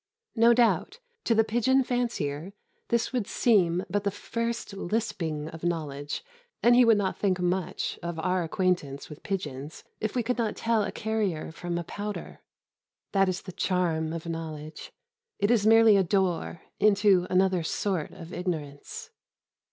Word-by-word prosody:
No 230 0 +6
doubt 240 - +2 0.3
to 230 - +3
the 225 - +5
pigeon 240 +4 +2
fancier 200 - -2 0.3
this 235 +2 0
would 245 -5 -1
seem 180 -6 +2
but 205 +2 -1
the 200 - +1
first 230 +2 -4
lisping 175 -6 -2
of 160 0 -10
knowledge, 150 -4 -3 0.4
and 240 - +6
he 250 - +7
would 230 -2 +5
not 195 -2 -1
think 190 -3 +1
much 180 0 -1
of 170 -1 -4
our 180 +3 0
acquaintance 165 -5 -1
with 150 - -10
pigeons 150 -7 -5 0.2
if 215 +2 -3
we 245 - +1
could 245 +1 -1
not 220 -3 0
tell 225 -1 +1
a 205 - -2
carrier 210 -8 -2
from 175 +1 -4
a 170 - -2
pouter. 205 +5 -6 0.7
That 195 -1 +3
is 185 0 -3
the 185 - -7
charm 170 -4 0
of 165 0 -5
knowledge 160 -2 -6 0.5
it 205 +2 +2
is 215 -3 +3
merely 225 -2 +7
a 195 - +4
door 180 -2 0 0.2
into 200 -3 +4
another 185 -1 +3
sort 170 0 -1
of 170 +1 -11
ignorance. 155 -6 -5
185 Hz, 160 wpm, -27 LUFS, 165-220 Hz, 0.7 s, he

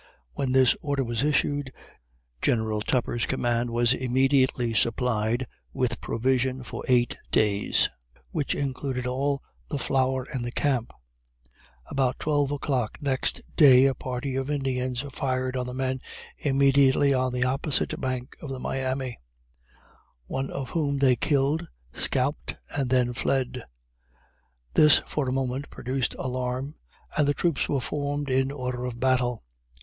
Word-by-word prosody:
When 135 -2 -1
this 130 -2 +5
order 140 -2 0
was 120 -1 -2
issued, 145 -1 +1 0.7
General 110 -2 +1
Tupper's 120 0 0
command 120 0 0
was 120 +1 +3
immediately 130 -1 +2
supplied 115 +1 +1 0.3
with 120 -2 -1
provision 130 +2 0
for - - -6
eight 120 -2 +2
days, 105 -1 +3 0.4
which 150 -3 -1
included 130 -2 -2
all 140 +3 -1 0.3
the 145 - -2
flour 130 0 +1
in 120 -2 -2
camp. 130 -5 0 0.9
About 130 -2 0
12 145 -2 +1
o'clock 130 -5 -1
next 135 -2 0
day 135 -4 +8
a 135 - +3
party 130 +1 -4
of 135 +1 -2
Indians 130 -3 -1
fired 130 -1 -1
on 125 -1 -2
the - - -4
men 130 0 -1 0.4
immediately 140 0 +4
on 130 -1 +1
the 125 0 0
opposite 135 +3 0
bank 130 -1 -3
of 150 - -7
the 135 -1 -4
Miami, 130 -1 -3 1.1
one 135 - -3
of 135 -2 -5
whom 145 -4 0
they 135 -2 +4
killed, 140 +4 +1 0.3
scalped, 135 +3 0 0.2
and 140 -3 -1
then 125 -1 +2
fled! 130 -1 -1 1.1
This, 150 -1 +6
for 140 -4 -2
a - - 0
moment, 135 +1 -2
produced 130 +1 -2
alarm, 130 +2 -3 0.4
and 150 -2 +3
the 145 - +2
troops 165 -1 0
were 140 - +1
formed 145 +1 -2
in 130 +1 +2
order 125 -3 -4
of 120 -1 -5
battle. 125 -2 +1
130 Hz, 135 wpm, -26 LUFS, 125-140 Hz, 1.1 s, day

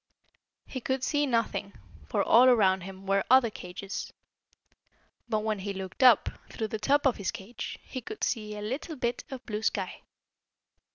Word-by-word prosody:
He 260 - -6
could 260 +1 -1
see 290 +1 +1
nothing, 230 -4 -1 0.4
for, - - +1
all 240 +3 +7
around 190 -6 +4
him, 190 +1 -9
were 195 0 +2
other 255 -3 +6
cages. 180 +1 -6 1.2
But 215 -2 +1
when 215 -1 -1
he 200 +1 -3
looked 190 +4 -6
up, 250 -5 +7 0.2
through 220 -1 -4
the 220 - -3
top 285 +7 +2
of 265 - +3
his 200 - -2
cage, 230 +1 -6
he 255 - -6
could 420 - -7
see 210 -2 -1
a 210 - -5
little 270 +9 -4
bit 240 -3 -2
of 265 -2 -8
blue 210 -1 -3
sky. - - -1
220 Hz, 170 wpm, -29 LUFS, 200-255 Hz, 1.2 s, all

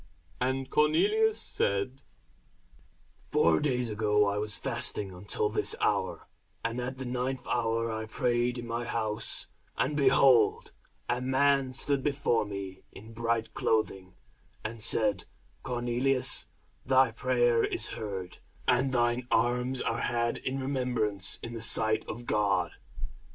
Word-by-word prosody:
And 130 +1 -1
Cornelius 425 - +2
said, 100 +7 -1 1.3
Four 80 -1 +3
days 125 -5 0
ago 105 -1 +2
I 100 +1 0
was 105 0 -1
fasting 100 -2 -1
until 100 +3 -1
this 105 - +1
hour; - - 0 0.4
and 115 +2 -2
at 130 +2 -5
the 130 - -5
ninth 125 +1 -3
hour 115 -1 0
I 110 0 -4
prayed 120 +1 0
in 120 - -6
my 115 +1 -3
house, 110 -2 -2 0.3
and, 145 +3 0
behold, 135 -3 +4 0.4
a 125 +1 -1
man 135 0 +2
stood 140 +1 0
before 140 -6 +1
me 100 -2 -7
in 110 +3 -12
bright 115 0 -1
clothing, 95 -4 -1 0.5
and 110 +1 -6
said, 105 -4 +2 0.4
Cornelius, 125 +1 +1 0.4
thy 130 -1 +4
prayer 120 0 +2
is 115 - +2
heard, 95 -5 -6 0.3
and 130 +1 +3
thine 120 0 +1
alms 125 +2 +1
are 115 0 -1
had 120 0 0
in 135 +1 -3
remembrance 125 -7 0
in 115 - -6
the 115 - -6
sight 110 -1 +3
of 120 +2 -7
God. 100 -6 +1
120 Hz, 130 wpm, -29 LUFS, 110-130 Hz, 1.3 s, behold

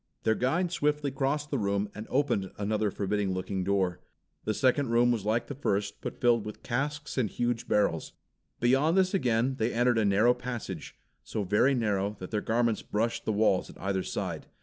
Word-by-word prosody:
Their 110 - +3
guide 165 +10 0
swiftly 150 -3 0
crossed 145 +2 -1
the 140 - 0
room 100 0 0
and 110 +1 -7
opened 125 -9 +1
another 105 +1 0
forbidding 100 -1 -1
looking 95 +1 -2
door. 95 -2 0 0.5
The 110 - +1
second 130 0 +2
room 120 +1 +4
was 110 -4 -1
like 110 +2 +1
the - - -6
first, 100 -7 -2
but - - -4
was - - -25
filled 120 -3 +4
with 105 - -8
casks 145 +3 -2
and 115 -5 +1
huge 120 +1 -2
barrels. 100 -6 +1 0.5
Beyond 135 +8 +3
this 185 0 +3
again 130 - +1
they 115 +2 +1
entered 120 0 +2
a 110 - +2
narrow 105 +5 +4
passage, 120 -10 -6 0.3
so 105 - -3
very 105 +8 +3
narrow 105 -3 0
that 90 - -8
their 105 -2 0
garments 115 -1 +1
brushed 115 +3 -2
the - - +1
walls 105 -3 +2
at - - -12
either 95 0 -1
side. - - -4
115 Hz, 195 wpm, -29 LUFS, 100-130 Hz, 0.5 s, room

